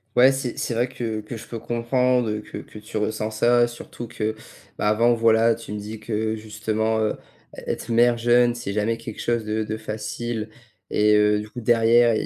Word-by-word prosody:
Ouais 130 Hz, +2 st, +7 dB
c'est 135 Hz, -2 st, -3 dB
c'est 120 Hz, -, -2 dB
vrai 120 Hz, +2 st, +1 dB
que 115 Hz, -3 st, -4 dB
que 110 Hz, +2 st, -7 dB
je -, -, -11 dB
peux 115 Hz, -, -6 dB
comprendre 120 Hz, -1 st, +1 dB
que -, -, -8 dB
que -, -, -12 dB
tu 105 Hz, +1 st, -6 dB
ressent 110 Hz, 0 st, -1 dB
ça, 120 Hz, +2 st, +3 dB
surtout 120 Hz, 0 st, -9 dB
que, 110 Hz, -2 st, -3 dB, 0.4 s
bah, 105 Hz, -, 0 dB
avant 115 Hz, +3 st, +4 dB
voilà, 115 Hz, 0 st, +4 dB
tu 115 Hz, -2 st, -8 dB
me 105 Hz, -, -4 dB
dis 105 Hz, +1 st, -7 dB
que, 110 Hz, 0 st, -2 dB
justement, 110 Hz, 0 st, -1 dB
heu, 110 Hz, -1 st, 0 dB, 0.4 s
ê -, -, -9 dB
être -, -, -6 dB
mère 120 Hz, +1 st, +5 dB
jeune, 120 Hz, 0 st, +4 dB
c'est 120 Hz, -4 st, -5 dB
jamais 110 Hz, +2 st, 0 dB
quelque 115 Hz, -, -8 dB
chose 120 Hz, -1 st, 0 dB
de 110 Hz, +1 st, -1 dB
de 110 Hz, 0 st, -3 dB
facile 110 Hz, +1 st, -4 dB, 0.4 s
et 105 Hz, 0 st, +4 dB
heu, 105 Hz, 0 st, +4 dB
du 105 Hz, 0 st, -7 dB
coup 125 Hz, -, -7 dB
derrière, 115 Hz, +1 st, +4 dB
il 110 Hz, -, -1 dB
110 Hz, 205 wpm, -23 LUFS, 110-120 Hz, 0.4 s, Ouais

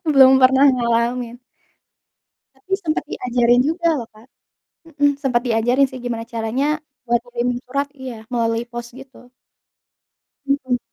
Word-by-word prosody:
Belum 265 Hz, -1 st, +7 dB
pernah 265 Hz, +2 st, +6 dB
ngalamin. 235 Hz, 0 st, -1 dB, 1.2 s
Tapi 265 Hz, +9 st, -14 dB
sempet 320 Hz, -7 st, -2 dB
diajarin 245 Hz, -2 st, +2 dB
juga 335 Hz, +1 st, 0 dB
loh 230 Hz, -, -7 dB
Kak. 225 Hz, +4 st, -18 dB, 0.6 s
Mhm, 290 Hz, -2 st, +2 dB
sempet 245 Hz, -3 st, +1 dB
diajarin 240 Hz, +4 st, +2 dB
sih, 260 Hz, -, -8 dB
gimana 230 Hz, -2 st, -4 dB
caranya 230 Hz, +5 st, -1 dB, 0.4 s
buat 235 Hz, 0 st, +2 dB
kirimin 245 Hz, 0 st, -2 dB
surat 280 Hz, +2 st, -1 dB
iya, 240 Hz, -4 st, -8 dB
melalui 230 Hz, -1 st, 0 dB
pos 240 Hz, 0 st, -5 dB
gitu 260 Hz, -2 st, -15 dB, 1.2 s
Mhm. 260 Hz, -3 st, 0 dB
245 Hz, 125 wpm, -20 LUFS, 235-270 Hz, 1.2 s, Belum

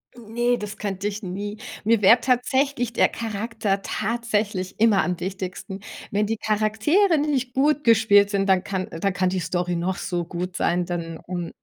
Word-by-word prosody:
Hm, 225 Hz, -2 st, -13 dB
ne, 240 Hz, +1 st, +2 dB
das 210 Hz, -2 st, -6 dB
könnte 200 Hz, -1 st, -3 dB
ich 210 Hz, +1 st, -4 dB
nie. 205 Hz, +3 st, -5 dB, 0.3 s
Mir 225 Hz, 0 st, +3 dB
wäre 225 Hz, +5 st, +7 dB
tatsächlich 250 Hz, 0 st, +1 dB
der -, -, +4 dB
Charakter 220 Hz, -2 st, -2 dB
tatsächlich 210 Hz, -4 st, -2 dB
immer 215 Hz, -4 st, +4 dB
am 180 Hz, -1 st, -2 dB
wichtigsten. 190 Hz, +1 st, -5 dB, 0.3 s
Wenn 210 Hz, +1 st, +1 dB
die 225 Hz, +1 st, -2 dB
Charaktere 220 Hz, -, +2 dB
nicht 275 Hz, -4 st, -1 dB
gut 295 Hz, +2 st, +2 dB
gespielt 205 Hz, -4 st, +5 dB
sind, 195 Hz, 0 st, 0 dB
dann 190 Hz, -1 st, +4 dB
kann 190 Hz, -1 st, -3 dB
dann 185 Hz, +4 st, -2 dB
kann 185 Hz, 0 st, +1 dB
die 185 Hz, -, -1 dB
Story 175 Hz, +1 st, -1 dB
noch 180 Hz, +2 st, -1 dB
so 175 Hz, -2 st, -3 dB
gut 180 Hz, +1 st, -5 dB
sein, 175 Hz, 0 st, +1 dB
dann, 165 Hz, -2 st, -5 dB
mm, 175 Hz, -2 st, -4 dB
205 Hz, 175 wpm, -24 LUFS, 185-230 Hz, 0.3 s, wäre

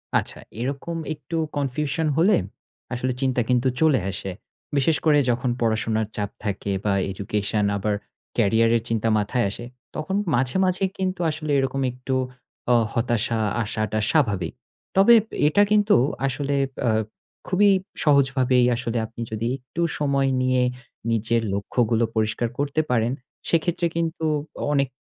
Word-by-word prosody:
আচ্ছা -, -, 0 dB, 0.2 s
এরকম 140 Hz, +6 st, -3 dB, 0.2 s
একটু 150 Hz, +2 st, -7 dB, 0.2 s
কনফিউশন 145 Hz, +3 st, -1 dB
হলে 190 Hz, +4 st, +5 dB, 0.6 s
আসলে 125 Hz, +1 st, -1 dB
চিন্তা 130 Hz, -2 st, +1 dB
কিন্তু 125 Hz, +1 st, +3 dB
চলে 155 Hz, -7 st, +5 dB
আসে। 95 Hz, 0 st, -4 dB, 0.5 s
বিশেষ 145 Hz, +3 st, +3 dB
করে 150 Hz, -2 st, +5 dB
যখন 125 Hz, +1 st, +1 dB
পড়াশুনার 110 Hz, -1 st, +1 dB
চাপ 105 Hz, -1 st, -2 dB
থাকে 100 Hz, -1 st, -2 dB
বা 100 Hz, -, +2 dB, 0.2 s
এডুকেশন 105 Hz, +2 st, -1 dB
আবার 105 Hz, +1 st, 0 dB, 0.4 s
কেরিয়ার 115 Hz, +1 st, +3 dB
এর 115 Hz, -, -3 dB
চিন্তা 115 Hz, 0 st, +1 dB
মাথায় 110 Hz, +3 st, 0 dB
আসে 120 Hz, +4 st, -7 dB, 0.3 s
তখন 155 Hz, +5 st, -2 dB, 0.2 s
মাঝে, 125 Hz, +5 st, +1 dB
মাঝে 185 Hz, +1 st, 0 dB
কিন্তু 185 Hz, -1 st, -2 dB
আসলে 155 Hz, -1 st, -3 dB
এরকম 135 Hz, 0 st, -1 dB
একটু 125 Hz, +1 st, -3 dB, 0.6 s
অ -, -, +6 dB, 0.2 s
হতাশা 115 Hz, -1 st, 0 dB, 0.2 s
আশাটা 110 Hz, 0 st, -2 dB
স্বাভাবিক। 105 Hz, -, +1 dB, 0.4 s
তবে 200 Hz, +5 st, +7 dB, 0.3 s
এটা 155 Hz, +7 st, +4 dB
কিন্তু 210 Hz, 0 st, +5 dB, 0.3 s
আসলে 140 Hz, +2 st, -1 dB, 0.3 s
অ -, -, +4 dB, 0.6 s
খুবই 200 Hz, +3 st, +4 dB, 0.3 s
সহজভাবেই 135 Hz, -3 st, +4 dB
আসলে 120 Hz, 0 st, -2 dB
আপনি 115 Hz, +1 st, -9 dB
যদি 110 Hz, +1 st, -2 dB
একটু 130 Hz, +6 st, -6 dB, 0.2 s
সময় 140 Hz, -2 st, +2 dB
নিয়ে 130 Hz, 0 st, +2 dB, 0.5 s
নিজের 115 Hz, +1 st, +1 dB
লক্ষ্যগুলো 115 Hz, +3 st, +1 dB
পরিষ্কার 110 Hz, +2 st, 0 dB
করতে 145 Hz, +2 st, 0 dB
পারেন, 115 Hz, -1 st, +2 dB, 0.4 s
সেক্ষেত্রে 170 Hz, +1 st, +1 dB
কিন্তু 165 Hz, -1 st, -1 dB, 0.5 s
অনেক 140 Hz, -1 st, +2 dB
125 Hz, 135 wpm, -24 LUFS, 115-150 Hz, 0.6 s, তবে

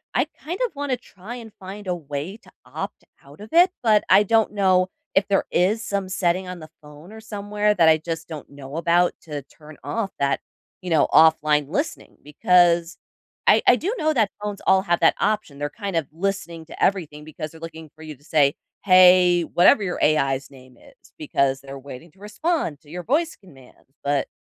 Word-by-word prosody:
I 255 Hz, -, +2 dB
kind 325 Hz, +3 st, -8 dB
of 475 Hz, -10 st, -3 dB
wanna 280 Hz, -2 st, -2 dB
try 225 Hz, -1 st, -11 dB
and 230 Hz, -3 st, -10 dB
find 195 Hz, +1 st, -9 dB
a 180 Hz, -, 0 dB
way 150 Hz, +5 st, -6 dB
to 230 Hz, -, -21 dB
opt -, -, -7 dB, 0.2 s
out 140 Hz, +6 st, -16 dB
of 215 Hz, -, -10 dB
it, 355 Hz, +2 st, +5 dB
but 215 Hz, -3 st, +3 dB
I 195 Hz, +2 st, +7 dB
don't 225 Hz, +1 st, +2 dB
know 185 Hz, -2 st, +2 dB, 0.3 s
if 195 Hz, +1 st, +3 dB
there 200 Hz, -, +1 dB
is 205 Hz, +6 st, +1 dB
some 200 Hz, -1 st, -3 dB
setting 185 Hz, 0 st, -1 dB
on 180 Hz, -1 st, -7 dB
the 155 Hz, -, -11 dB
phone 150 Hz, +6 st, -14 dB
or 220 Hz, -, -11 dB
somewhere 210 Hz, -1 st, -1 dB
that 165 Hz, -5 st, +4 dB
I 155 Hz, -, +5 dB
just 160 Hz, 0 st, -6 dB
don't 155 Hz, -3 st, -8 dB
know 140 Hz, 0 st, -10 dB
about 175 Hz, +1 st, +2 dB
to 150 Hz, -3 st, -6 dB
turn 150 Hz, +2 st, -16 dB
off 215 Hz, -4 st, -3 dB
that, 140 Hz, 0 st, +1 dB, 0.4 s
you 180 Hz, -, -6 dB
know, 160 Hz, -, +3 dB
offline 150 Hz, -2 st, +4 dB
listening 285 Hz, -, -4 dB
because 170 Hz, +2 st, +2 dB, 0.5 s
I -, -, +6 dB
I 250 Hz, -, +7 dB
do 360 Hz, -, -2 dB
know 310 Hz, -3 st, +1 dB
that 220 Hz, -7 st, +2 dB
phones 205 Hz, -1 st, -5 dB
all 190 Hz, 0 st, +4 dB
have 175 Hz, -2 st, +1 dB
that 165 Hz, -, +4 dB
option, 210 Hz, -9 st, -1 dB
they're 145 Hz, -, -2 dB
kind 200 Hz, -2 st, -5 dB
of 160 Hz, -4 st, 0 dB
listening 170 Hz, -2 st, -4 dB
to -, -, -6 dB
everything 155 Hz, -6 st, -1 dB
because 155 Hz, 0 st, -7 dB
they're 160 Hz, -, -14 dB
looking 160 Hz, -1 st, -9 dB
for 160 Hz, -, -17 dB
you 155 Hz, -2 st, -8 dB
to 140 Hz, -, -27 dB
say, 145 Hz, -3 st, +2 dB, 0.3 s
"Hey, 180 Hz, -2 st, +6 dB
whatever 190 Hz, -, +4 dB
your 180 Hz, -, -3 dB
AI's 135 Hz, -3 st, +1 dB
name 130 Hz, -2 st, -17 dB
is," -, -, -21 dB
because 140 Hz, -3 st, 0 dB
they're 135 Hz, 0 st, -9 dB
waiting 140 Hz, +4 st, -11 dB
to 190 Hz, -, -27 dB
respond 210 Hz, -, -2 dB
to 150 Hz, -, -20 dB
your 180 Hz, +2 st, -7 dB
voice 315 Hz, -, 0 dB
command, 135 Hz, -12 st, -19 dB, 0.2 s
but 140 Hz, -1 st, 0 dB
180 Hz, 200 wpm, -22 LUFS, 150-205 Hz, 0.5 s, I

